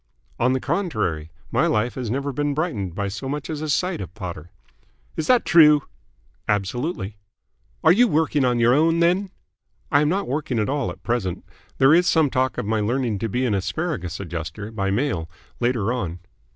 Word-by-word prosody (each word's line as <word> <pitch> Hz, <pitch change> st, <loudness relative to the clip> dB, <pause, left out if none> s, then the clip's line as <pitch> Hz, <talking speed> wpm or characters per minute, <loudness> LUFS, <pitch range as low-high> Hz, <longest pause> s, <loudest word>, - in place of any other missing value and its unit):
"On 125 Hz, +2 st, +3 dB
the 130 Hz, -, 0 dB
contrary. 110 Hz, -, -2 dB, 0.2 s
My -, -, +2 dB
life 110 Hz, +3 st, +1 dB
has 125 Hz, -4 st, -4 dB
never 140 Hz, +4 st, -2 dB
been 145 Hz, +1 st, -1 dB
brightened 110 Hz, -, -2 dB
by 100 Hz, +1 st, -2 dB
so 115 Hz, +7 st, -5 dB
much 150 Hz, +2 st, -4 dB
as 155 Hz, -1 st, -4 dB
a 155 Hz, -, -3 dB
sight 180 Hz, -, 0 dB
of 90 Hz, -1 st, -8 dB
Potter." 85 Hz, -5 st, -7 dB, 0.7 s
"Is 155 Hz, -, -3 dB
that 250 Hz, -1 st, +4 dB
true?" 150 Hz, -4 st, +6 dB, 0.6 s
"Absolutely." 105 Hz, -, -2 dB, 0.7 s
"Are 160 Hz, -, +7 dB
you 240 Hz, +7 st, +5 dB
working 155 Hz, -, +1 dB
on 125 Hz, -1 st, +2 dB
your 120 Hz, +1 st, +5 dB
own, 165 Hz, +4 st, +3 dB
then?" 180 Hz, +4 st, +2 dB, 0.6 s
"I 145 Hz, -1 st, +5 dB
am 150 Hz, -, +2 dB
not 195 Hz, +4 st, -1 dB
working 135 Hz, -2 st, -2 dB
at 105 Hz, +1 st, 0 dB
all 140 Hz, -1 st, -1 dB
at -, -, -9 dB
present. 110 Hz, -7 st, -2 dB, 0.3 s
There 135 Hz, +3 st, +6 dB
is 175 Hz, +2 st, +4 dB
some 160 Hz, -5 st, +3 dB
talk 130 Hz, +1 st, 0 dB
of -, -, -2 dB
my 110 Hz, +1 st, 0 dB
learning 115 Hz, -1 st, 0 dB
to 115 Hz, +2 st, -2 dB
be 125 Hz, +5 st, 0 dB
an 115 Hz, -, +1 dB
Asparagus 100 Hz, -, -2 dB
Adjuster 85 Hz, +3 st, -6 dB
by 100 Hz, -3 st, -2 dB
mail 95 Hz, -, -1 dB, 0.3 s
later 120 Hz, -2 st, +1 dB
on." 90 Hz, -9 st, -3 dB
125 Hz, 190 wpm, -23 LUFS, 105-150 Hz, 0.7 s, Are